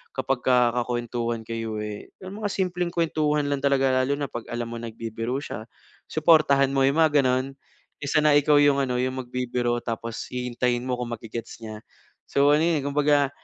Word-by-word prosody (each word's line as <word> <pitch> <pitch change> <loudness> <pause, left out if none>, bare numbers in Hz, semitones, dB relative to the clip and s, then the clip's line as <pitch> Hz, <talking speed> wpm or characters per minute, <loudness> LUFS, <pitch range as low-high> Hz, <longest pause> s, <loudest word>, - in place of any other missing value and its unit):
kapagka 125 -2 +2
kakuwentuhan 120 -1 -3
kayo, 115 -1 -4
eh, 105 -1 -7 0.2
yung 200 +3 -8
mga 205 - -1
simpleng 180 -2 -1
kwentuhan 155 -3 +1
lang 140 -1 -1
talaga. 135 -2 +2
Lalo 140 +2 0
na 145 - -2
pag 120 - -6
alam 120 0 -3
mong 115 0 -6
nagbibiro 115 +2 -4
siya, 110 -5 -7 0.4
suportahan 150 -4 +4
mo 135 - +2
yung 140 - -1
mga 150 -2 +4
ganun. 130 +1 0 0.5
Kesa 140 +1 0
na 150 -1 +5
ikaw 145 +1 +5
yung 145 -1 +4
ano, 125 -2 -1
yung 130 +1 -1
magbibiro 120 -1 -2
tapos 115 0 -4
hihintayin 125 0 -1
mo 125 -1 -1
kung 120 -1 -4
ma-ge-gets 115 0 -7
niya. 110 -1 -8 0.4
So, 140 +1 +3
ano, 155 - +2
eh, 165 -3 +1
kumbaga 145 0 +2
130 Hz, 175 wpm, -25 LUFS, 120-145 Hz, 0.5 s, na